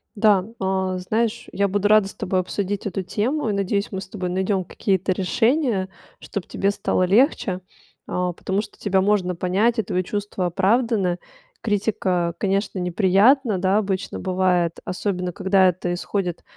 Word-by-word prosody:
Да, 205 -3 +4 0.2
а, 190 -1 0
знаешь, 220 +5 -1
я 200 0 +1
буду 205 +1 +1
рада 215 -2 +5
с - - -10
тобой 185 0 -1
обсудить 200 +2 -3
эту 190 0 -3
тему 235 - -1
и, - - 0
надеюсь, 200 +1 -1
мы 190 -1 -4
с - - -9
тобой 185 -4 -4
найдём 190 +1 0
какие-то 190 0 -1
решения, 220 - +1 0.3
чтобы 195 -4 -6
тебе 200 +1 0
стало 185 - 0
легче, 195 - +2 0.5
а, 180 -1 -1
потому 190 +4 -2
что - - -12
тебя 190 -2 +2
можно 190 -3 +1
понять, 200 +7 +1
и - - +2
твои 185 0 -1
чувства 200 -2 -3
оправданы. 195 -1 +1 0.4
Критика, 190 -5 0
конечно, 195 -1 -1
неприятна, 195 +5 +3
да, 190 +2 +2
обычно 195 -2 -2
бывает, 180 -2 +1
особенно, 180 -1 -2
когда 190 +1 +3
это 175 0 -1
исходит 180 -1 -3
195 Hz, 155 wpm, -22 LUFS, 185-205 Hz, 0.5 s, рада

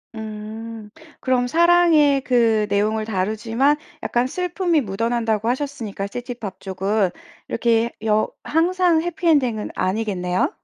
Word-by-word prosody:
음. 220 0 -7 0.3
그럼 250 -1 +1
사랑의 330 -3 +4
그 230 -4 +2
내용을 215 +2 +1
다루지만 225 +8 0 0.3
약간 240 +1 +1
슬픔이 355 -1 0
묻어난다고 225 +1 -1
하셨으니까 245 -7 -3
시티팝 235 -4 -7
쪽은. 195 +1 0 0.4
이렇게 230 0 +1
여 215 0 +2
항상 345 0 +2
해피 350 +1 -3
엔딩은 250 -9 +2
아니겠네요? 185 - 0
230 Hz, 280 characters per minute, -21 LUFS, 210-285 Hz, 0.4 s, 사랑의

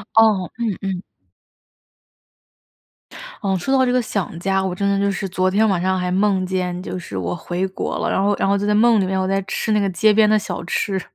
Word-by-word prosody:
哦， 215 -5 +4
嗯， 225 -5 -1
嗯。 190 -2 -3 2.4
嗯， 195 -2 0
说 265 +10 -2
到 260 - +4
这 250 - +1
个 250 0 +2
想 200 -7 -3
家， 190 +1 0
我 190 -1 -2
真 200 +2 -1
的 200 0 +1
就 200 0 +1
是 195 0 -3
昨 185 0 0
天 210 +4 +2
晚 190 -4 +1
上 190 +1 +1
还 180 0 -2
梦 190 0 +1
见 180 -1 -2
就 185 - -5
是 135 - -7
我 90 -1 -2
回 180 +2 -3
国 190 - -4
了， - - -1
然 190 - +1
后 205 0 +2
然 - - 0
后 200 +1 +2
就 200 - -2
在 210 - +2
梦 225 +1 +5
里 - - +1
面， 190 0 -1
我 185 - 0
在 195 +1 0
吃 - - -2
那 210 - +3
个 200 -1 +1
街 210 +3 +3
边 215 0 +4
的 215 - +4
小 205 -4 -4
吃。 190 +2 -1
195 Hz, 255 characters per minute, -20 LUFS, 185-210 Hz, 2.4 s, 梦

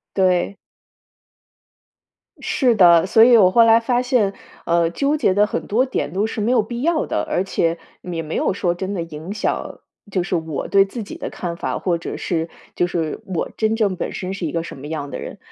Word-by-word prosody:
对。 185 +1 +2 1.8
是 250 -4 +1
的， 175 -3 +6
所 220 +3 +5
以 240 0 +7
我 185 -3 +5
后 230 +3 +6
来 225 0 +6
发 240 +1 0
现， 245 -6 +1 0.3
呃， 170 0 +2
纠 285 - 0
结 195 -10 +2
的 205 +1 +4
很 - - -4
多 245 +6 +2
点 145 - -3
都 200 +3 +1
是 220 - -4
没 215 +3 +1
有 250 - +4
必 235 +3 -6
要 325 +1 +1
的， - - -1
而 185 - -1
且 170 -3 0 0.2
也 170 -2 -4
没 155 0 -5
有 - - +1
说 180 -2 0
真 190 +3 -4
的 180 - -2
影 165 +3 -7
响， 215 - -3 0.3
就 185 -2 0
是 185 -1 -2
我 160 -4 -3
对 195 0 +4
自 225 +3 -6
己 200 - -9
的 - - -5
看 170 -2 -5
法， - - -3
或 175 -3 0
者 170 - -6
是 165 -1 -2 0.3
就 175 - +1
是 165 -3 -3
我 185 -4 -3
真 220 0 +1
正 205 -4 +1
本 - - -4
身 185 +1 -4
是 190 -3 -4
一 150 - -2
个 165 +1 -2
什 - - -9
么 140 +2 -8
样 150 -3 -4
的 - - -6
人。 - - -7
190 Hz, 235 characters per minute, -20 LUFS, 170-220 Hz, 1.8 s, 以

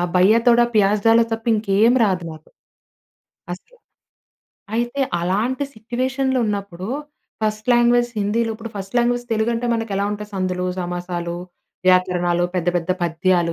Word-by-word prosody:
భయ్యా 200 +6 +5
తోడ 240 0 +6
ప్యాజ్ 205 0 +3
దాలొ 230 +1 +6
తప్ప 225 +1 -3
ఇంకేమి 215 +3 +3
రాదు 185 -4 +1
నాకు 155 0 -13 1.0
అసలు. 340 - -10 1.0
అయితే 240 +4 -1 0.2
అలాంటి 220 +10 0
సిట్యుయేషన్‌లొ 260 +4 -1
ఉన్నప్పుడు 200 -2 -4 0.5
ఫస్ట్ 215 0 -1
లాంగ్వేజ్ 240 0 +3
హిందీలో 225 +3 0
ఇప్పుడు 225 0 -8
ఫర్స్ట్ 195 +3 -5
లాంగ్వేజ్ 240 0 +1
తెలుగు 220 +1 +1
అంటే 235 +1 -2
మనకు 225 -2 -3
ఎలా 200 - 0
ఉంటాయి 210 0 -7
సందులు, 185 -1 -1
సమాసాలు, 175 -1 -4 0.5
వ్యాకరణాలు, 180 -1 +2
పెద్ద, 175 0 0
పెద్ద 170 +1 -2
పద్యాలు, 170 0 +1
210 Hz, 135 wpm, -21 LUFS, 180-235 Hz, 1.0 s, తోడ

